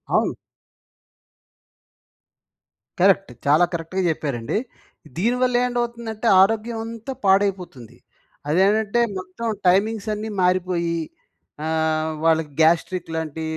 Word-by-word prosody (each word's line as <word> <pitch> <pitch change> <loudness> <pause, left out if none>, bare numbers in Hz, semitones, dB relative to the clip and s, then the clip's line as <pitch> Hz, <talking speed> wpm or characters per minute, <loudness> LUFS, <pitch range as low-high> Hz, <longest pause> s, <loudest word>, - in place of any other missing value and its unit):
అవును. - - +2 2.7
కరెక్ట్. 195 -3 +3
చాలా 150 +5 +5
కరెక్ట్‌గా 170 +3 -3
చెప్పారండి. 140 - -2 0.6
దీనివల్ల 250 +5 +1
ఏంటవుతుందంటే, 235 -2 -3
ఆరోగ్యం 225 +3 +1
అంతా 230 +3 -6
పాడైపోతుంది. 185 - 0 0.5
అదేంటంటే 205 +6 +2 0.2
మొత్తం 185 +5 -6 0.2
టైమింగ్స్ 210 +3 +1
అన్నీ 215 +1 -5
మారిపోయి 180 -2 0 0.7
ఆహ్, 160 0 0
వాళ్ళకి 160 -2 +2
గ్యాస్ట్రిక్ 170 +2 +2
లాంటి 160 0 -4
185 Hz, 85 wpm, -22 LUFS, 160-220 Hz, 2.7 s, చాలా